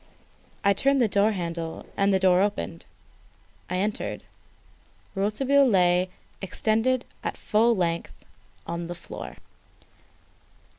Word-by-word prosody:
I 200 - +5
turned 275 +7 +3
the 240 - +4
door 205 +1 +3
handle 170 -4 -4
and 200 0 +2
the 190 - +4
door 185 -1 +4
opened. 200 - -2 0.8
I 180 - -1
entered. 205 +3 -2 0.9
Rouletabille 260 +8 +3
lay 180 -3 +3 0.3
extended 225 +6 0 0.2
at - - -3
full 230 +2 +3
length 170 -3 -2 0.4
on 170 0 -4
the 175 - -5
floor. 175 - -8
195 Hz, 110 wpm, -26 LUFS, 175-220 Hz, 0.9 s, I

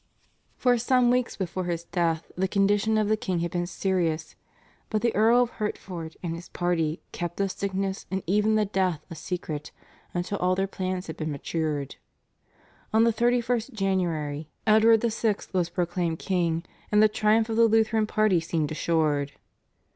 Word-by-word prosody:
For 245 -2 +3
some 245 0 +3
weeks 250 -1 +1
before 185 -1 -3
his 170 -1 -2
death 170 -2 -1
the 190 +1 0
condition 205 +3 +2
of 215 -1 +2
the 215 - +3
king 185 -5 -2
had 170 0 -2
been 175 -1 -1
serious, 175 -4 -1 0.5
but 215 -1 -1
the 235 - +2
Earl 230 +4 +5
of 240 - -3
Hertford 175 -6 -5
and 170 -2 -2
his 170 +2 -8
party 170 -3 -1
kept 175 -1 -4
the 200 - +1
sickness 195 0 -3
and 190 +1 -2
even 210 +4 +2
the 215 -1 +3
death 185 -5 -1
a - - -5
secret 155 -2 -5 0.4
until 175 +3 -3
all 180 +1 +2
their 195 +1 +1
plans 185 -1 -3
had 160 - -7
been 155 -1 -3
matured. 145 -1 -3 0.9
On 220 +1 +4
the 230 0 +3
31st 240 +1 +1
January 165 -7 -1 0.2
Edward 220 +1 +5
VI. 225 -2 +1 0.2
was 180 -2 +1
proclaimed 175 -1 -1
king, 170 -3 0 0.3
and 210 0 +5
the - - +8
triumph 215 +1 +2
of 225 - -1
the 230 0 +6
Lutheran 220 0 +2
party 215 -5 +3
seemed 160 -2 -2
assured. 150 -3 0
190 Hz, 170 wpm, -26 LUFS, 170-215 Hz, 0.9 s, the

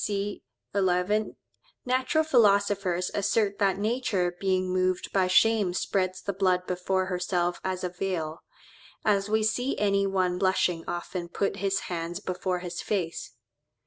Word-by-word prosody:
C. 205 0 -2 0.3
11), 195 +2 +1 0.5
"Natural 255 +5 +2
philosophers 200 - +2
assert 205 0 +1
that 195 -2 +2
nature 205 -5 0
being 185 -1 0
moved 185 0 0
by 190 -2 +3
shame 200 -1 +3
spreads 185 -1 -1
the 200 - -2
blood 185 -1 +1
before 185 +1 -1
herself 180 -1 -1
as 185 -1 -2
a 180 - -1
veil, 175 -3 -3 0.7
as 200 -1 +2
we 220 0 +2
see 245 +5 0
any 200 -1 +2
one 185 -2 0
blushing 185 -3 +1
often 175 0 -4
puts 195 - -1
his 195 0 0
hands 170 0 -4
before 180 0 -2
his 175 -1 -5
face." 180 -6 -3
190 Hz, 140 wpm, -27 LUFS, 180-205 Hz, 0.7 s, by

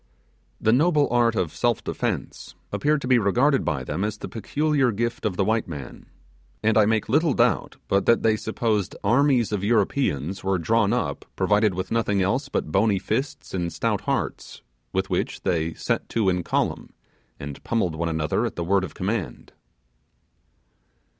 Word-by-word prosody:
The 110 - +3
noble 150 +2 +3
art 120 -2 +3
of 90 -6 -1
self - - 0
defence - - -4 0.2
appeared 150 0 +1
to 125 - -4
be 125 -1 +5
regarded 125 +7 +2
by 70 -3 -1
them 90 - -3
as 105 0 -2
the - - -6
peculiar 140 +4 0
gift 115 +2 -2
of 90 -4 -4
the 95 - +2
white 110 +1 +1
man; 70 -7 -8 0.6
and 110 0 +3
I 110 -2 +5
make 110 -1 +1
little 150 +4 +2
doubt - - +1
that 100 +4 +3
they 110 -1 +4
supposed 110 -3 -1
armies 125 +1 +3
of 100 -2 -2
Europeans 100 - 0
were 95 0 +1
drawn 105 +4 +2
up 100 -13 -2
provided 105 -2 +2
with 95 - -4
nothing 110 -3 +1
else 125 +10 0
but 80 - -2
bony 100 +3 +3
fists 135 +9 -3
and 85 -2 -2
stout 80 - -1
hearts, - - -3 0.3
with - - -2
which - - -1
they 80 -1 0
set - - -2
to 110 -4 +1
in 90 -1 0
column, - - -1 0.5
and 70 -1 -8
pummelled 110 -8 0
one 85 +1 -1
another 80 -2 0
at - - -7
the 85 - -3
word 95 +2 +2
of - - -6
command. 100 +1 -4
105 Hz, 170 wpm, -24 LUFS, 95-120 Hz, 0.6 s, be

